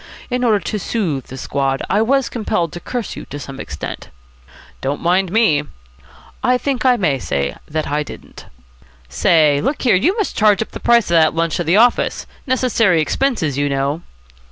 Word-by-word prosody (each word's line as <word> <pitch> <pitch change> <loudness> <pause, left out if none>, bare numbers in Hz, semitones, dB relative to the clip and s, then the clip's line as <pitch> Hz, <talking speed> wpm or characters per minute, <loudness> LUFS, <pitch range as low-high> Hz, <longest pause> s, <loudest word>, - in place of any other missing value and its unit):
In 250 0 0
order 220 -4 +3
to 210 +2 -4
soothe 175 - -2
the 130 - -9
squad 135 0 -1
I 205 - +2
was 265 +3 +2
compelled 175 -8 -2
to 175 - -6
curse 240 +3 -5
you - - -8
to 145 - -8
some 135 -2 -8
extent." 75 - -7 0.7
"Don't 140 +2 -2
mind 180 +1 +1
me." 190 -10 +3 0.8
"I 250 0 +3
think 270 0 -2
I 250 -1 +4
may 155 - +1
say 70 - -2 0.2
I 150 -1 -1
didn't." 150 - -10 0.6
"Say, 145 - +3
look 280 - -2
here, 245 - +4
you 335 - +2
must 425 - -2
charge 210 -1 +3
up - - -20
the - - -7
price 235 -6 +3
of - - +3
that 155 - +2
lunch 165 -1 0
to 175 - -1
the 170 +4 +2
office. 240 +2 +2 0.2
Necessary 235 -9 +2
expenses, 160 - 0
you 145 0 +1
know." 140 +3 -1
175 Hz, 180 wpm, -18 LUFS, 145-235 Hz, 0.8 s, I